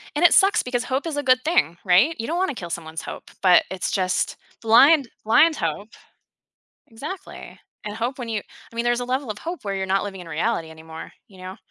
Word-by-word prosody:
And 315 - 0
it 350 - +7
sucks 400 +3 +5
because 250 -1 -2
hope 265 +5 -2
is 305 -3 -4
a 290 - -1
good 255 -1 +3
thing, 310 - +1
right? 200 - +4
You 225 - -3
don't 335 +2 -2
wanna 375 -6 0
kill 175 -6 -7
someone's 160 -1 -5
hope, - - -9
but 180 -2 +6
it's 190 -1 -3
just 185 -2 0 0.2
blind 270 +4 +5
blind 310 +9 +4
hope. 170 - -3 1.0
Exactly, 290 +12 -9 0.3
and 210 0 -5
hope 240 +4 -3
when 240 -2 -6
you 215 -2 -1
I - - -20
mean, 235 - -1
there's 240 0 +1
a - - -3
level 255 0 -2
of 210 - -5
hope 340 +6 -6
where 200 -1 -2
you're 190 0 -2
not 195 +1 +1
living 195 -2 -7
in 170 - -10
reality 165 0 -2
anymore, 160 0 -11 0.2
you 190 - -18
know? 185 +1 -8
225 Hz, 220 wpm, -23 LUFS, 185-275 Hz, 1.0 s, it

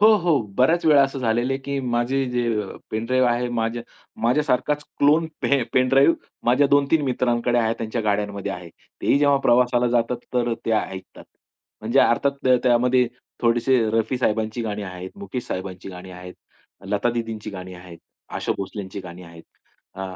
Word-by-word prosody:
हो, 215 +1 +7
हो. 170 -5 +2 0.2
बऱ्याच 160 +8 +3
वेळा 145 -3 +7
असं 135 0 -1
झालेलं 120 +2 0
आहे, 135 - -1
की 140 0 -3
माझे 125 +2 0
जे 125 0 0 0.5
पेन 110 +1 -2
ड्राइव्ह 130 0 +3
आहे 120 +1 0
माझ्या 115 0 -2 0.4
माझ्यासारखाच 150 +3 +1 0.2
क्लोन 150 +3 +4 0.2
पे 140 -3 +2
पेन 130 0 +3
ड्राइव्ह 135 +5 +5 0.3
माझ्या 130 +4 +4
2-3 145 +2 +3
मित्रांकडे 120 -1 +1
आहे. 115 0 +1
त्यांच्या 115 +1 -3
गाड्यांमध्ये 100 -1 -1
आहे. 90 -2 -8 0.3
तेही 140 - +3
जेव्हा 145 -1 +4
प्रवासाला 120 0 +3
जातात. 120 0 +1 0.2
तर 120 -1 +1
ते 115 - 0
ऐकतात. 95 -3 -4 0.6
म्हणजे 115 +5 0
अर्थात 140 +4 +3
त 130 -1 +6
त्यामध्ये 125 0 +3 0.4
थोडेसे 120 +2 +3
रफी 115 +3 0
साहेबांची 110 0 -1
गाणी 105 -2 -3
आहेत, 90 -1 -7
मुकेश 130 -11 -5
साहेबांची 95 0 -6
गाणी 90 0 -9
आहेत, 90 0 -10 0.5
लता 105 +4 0
दीदींची 115 -2 -4
गाणी 95 -2 -8
आहेत, 90 -2 -12 0.4
आशा - - -1
भोसलेची 100 0 -6
गाणी 90 0 -10
आहेत. 85 -1 -13 0.5
अ, 95 - -6
120 Hz, 165 wpm, -23 LUFS, 105-130 Hz, 0.6 s, हो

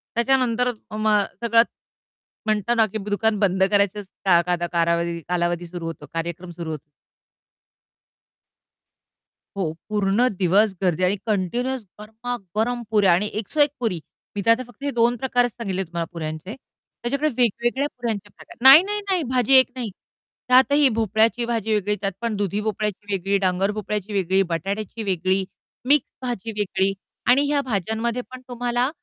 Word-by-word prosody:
त्याच्यानंतर 250 -1 +2 0.2
अ, - - -7
मग 215 -1 +3 0.2
सगळंच 230 0 +4 0.8
म्हणतो 215 +1 +1
ना 225 - +6
की 220 - -3
ब 210 - -6
दुकान 210 +1 +1
बंद 190 -2 +2
करायचं 205 0 +2
स - - -23 0.2
का 175 -3 +5
काध 175 -1 0
कालावधी- 170 0 +1
कालावधी 175 -1 0
सुरू 170 -1 -7
होतो, 165 -2 -6
कार्यक्रम 170 +2 -4
सुरू 165 -2 -4
होतो. 150 0 -8 2.7
हो, 180 -6 -2 0.2
पूर्ण 210 +3 +2
दिवस 195 +3 +3
गर्दी 180 -1 +1
आणि 185 +2 +3
कंटिन्युअस 240 +6 -1 0.2
गरमा-गरम 225 +1 -3
पुऱ्या 205 -5 +4
आणि 205 +4 +1
एक 215 0 -4
सो 310 - -3
एक 290 0 +6
पुरी. 220 -8 -1 0.4
मी 205 - -2
तर 230 - +6
आता 240 +3 +2
फक्त 245 +3 -16
हे 285 - -1
2 235 +1 +4
प्रकारच 245 -1 +1
सांगितले 195 -5 -3
तुम्हाला 170 -1 -4
पुऱ्यांचे. 160 +5 -5
त्याच्याकडे 275 +2 -5
वेगवेगळ्या 240 +3 +1
पुऱ्यांचे 215 -4 -3
प्रकार - - -16
नाही, 270 +4 +11
नाही, 415 +1 -2
नाही, 370 -4 +2
भाजी 255 +1 +2
एक 260 0 +7
नाही. 245 -4 -3 0.6
त्यातही 265 +3 +5
भोपळ्याची 225 +1 +1
भाजी 225 -2 -1
वेगळी, 210 0 +1
त्यात 195 -1 -1
पण 230 -2 -1
दुधी 200 0 -1
भोपळ्याची 210 -1 -3
वेगळी, 195 +1 +1
डांगर 190 +1 +1
भोपळ्याची 210 -1 -4
वेगळी, 190 0 +2
बटाट्याची 200 +6 -3
वेगळी, 190 0 0 0.4
मिक्स 285 -1 +4
भाजी 235 -3 -4
वेगळी 195 -1 +1 0.4
आणि 255 +3 +6
ह्या 285 0 +1
भाज्यांमध्ये 225 +1 -2
पण 255 0 -9
तुम्हाला 245 +1 -1
210 Hz, 155 wpm, -23 LUFS, 190-240 Hz, 2.7 s, नाही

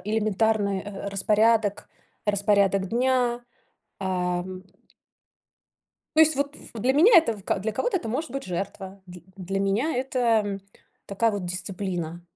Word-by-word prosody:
элементарный, 210 -1 +1
э, 200 0 -6
распорядок 210 +1 +2 0.4
распорядок 200 -2 +2
дня, 245 +1 +1 0.6
ам 185 0 -2 1.5
То - - +7
есть, 315 -2 +5
вот, 285 +1 -2
ф - - -15
для 245 +4 +1
меня 355 - +6
это 275 -10 +4
в 195 - -14
ка - - 0
для 215 +3 -3
кого-то 435 - 0
это 235 - -4
может 265 +7 -3
быть 275 +2 -5
жертва, 190 +1 -5
дл 180 0 -11 0.2
для 195 +1 -3
меня 210 +11 0
это, 260 0 -2 0.3
м, 200 -1 -4 0.5
такая 225 +3 +1
вот 205 -3 -4
дисциплина. 180 -2 -4
205 Hz, 140 wpm, -25 LUFS, 190-240 Hz, 1.5 s, То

